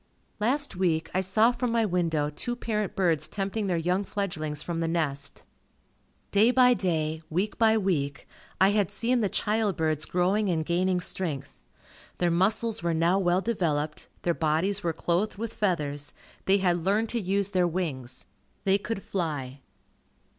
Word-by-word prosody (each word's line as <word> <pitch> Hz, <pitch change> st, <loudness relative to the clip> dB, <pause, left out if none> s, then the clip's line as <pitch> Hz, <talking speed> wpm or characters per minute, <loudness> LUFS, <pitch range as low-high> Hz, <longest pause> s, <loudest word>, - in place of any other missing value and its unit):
Last 265 Hz, +4 st, 0 dB
week, 170 Hz, -3 st, 0 dB
I 185 Hz, -, +2 dB
saw 215 Hz, +5 st, +3 dB
from 245 Hz, 0 st, -2 dB
my 230 Hz, -1 st, +2 dB
window 165 Hz, -6 st, 0 dB
two 240 Hz, +10 st, -3 dB
parent 215 Hz, -5 st, -2 dB
birds 170 Hz, -5 st, +1 dB
tempting 200 Hz, +1 st, -2 dB
their 180 Hz, -2 st, +1 dB
young 180 Hz, +4 st, 0 dB
fledglings 155 Hz, -8 st, -3 dB
from 170 Hz, -1 st, -3 dB
the 165 Hz, -, 0 dB
nest. 145 Hz, -4 st, -2 dB, 0.9 s
Day 210 Hz, +3 st, +5 dB
by 250 Hz, 0 st, +6 dB
day, 160 Hz, -7 st, -1 dB
week 190 Hz, +8 st, -1 dB
by 220 Hz, -1 st, +5 dB
week, 150 Hz, -9 st, -1 dB, 0.3 s
I 190 Hz, +1 st, +5 dB
had 205 Hz, -3 st, +1 dB
seen 235 Hz, +4 st, 0 dB
the 205 Hz, -, +1 dB
child 210 Hz, -2 st, 0 dB
birds 155 Hz, -1 st, 0 dB
growing 190 Hz, +4 st, +1 dB
and 160 Hz, -3 st, 0 dB
gaining 180 Hz, +2 st, +1 dB
strength. 165 Hz, -7 st, -4 dB, 0.6 s
Their 175 Hz, -1 st, +1 dB
muscles 215 Hz, +6 st, +1 dB
were 170 Hz, -1 st, 0 dB
now 170 Hz, +4 st, +3 dB
well 180 Hz, 0 st, +2 dB
developed, 155 Hz, -9 st, -1 dB, 0.2 s
their 170 Hz, -, +2 dB
bodies 165 Hz, +6 st, +1 dB
were 170 Hz, -, 0 dB
clothed 175 Hz, +6 st, -1 dB
with 230 Hz, +1 st, -4 dB
feathers, 150 Hz, -8 st, -1 dB, 0.3 s
they 195 Hz, +1 st, +4 dB
had 180 Hz, -3 st, +2 dB
learned 210 Hz, +4 st, +1 dB
to 235 Hz, -, -1 dB
use 195 Hz, +1 st, 0 dB
their 185 Hz, -3 st, +2 dB
wings, 140 Hz, -8 st, -4 dB, 0.4 s
they 195 Hz, 0 st, +3 dB
could 215 Hz, -1 st, -4 dB
fly. 145 Hz, -7 st, -3 dB
185 Hz, 160 wpm, -27 LUFS, 160-210 Hz, 0.9 s, by